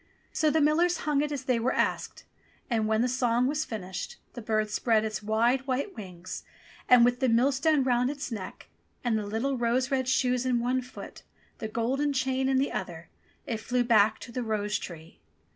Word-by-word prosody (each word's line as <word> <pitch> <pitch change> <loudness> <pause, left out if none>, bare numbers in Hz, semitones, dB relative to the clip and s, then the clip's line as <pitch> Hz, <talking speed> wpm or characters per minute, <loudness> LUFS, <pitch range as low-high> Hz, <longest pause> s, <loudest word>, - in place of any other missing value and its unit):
So 310 - +2
the 315 +1 +2
millers 335 +4 +3
hung 295 -2 +2
it 295 0 -1
as 285 -2 -3
they 255 -2 +1
were 245 +3 0
asked; - - -1 0.5
and 220 -2 +1
when 220 +1 +2
the - - +2
song 245 -1 +1
was 300 +4 0
finished, 190 - -6 0.2
the 240 - -7
bird 215 -1 0
spread 220 -1 +2
its 215 -1 -3
wide 235 +5 +1
white 275 +9 -2
wings 185 -4 -8 0.5
and, 245 -1 +8
with 245 0 +1
the 260 -2 +2
millstone 270 +5 +3
round 250 0 +2
its 280 -3 -5
neck 205 -5 -7 0.4
and 240 -2 +1
the 210 -2 -2
little 240 +5 -1
rose 245 +3 +1
red 260 -2 0
shoes 250 -1 +2
in 250 -2 +1
one 250 +2 0
foot, 250 +1 -10 0.4
the 220 - -3
golden 260 +6 0
chain 265 0 0
in 265 - +2
the 270 +2 +1
other, - - -5 0.4
it 230 - -2
flew 245 +3 0
back 220 -2 +4
to 240 - -9
the 250 - -3
rose 210 -2 -1
tree. 165 -2 -10
245 Hz, 195 wpm, -28 LUFS, 220-265 Hz, 0.5 s, and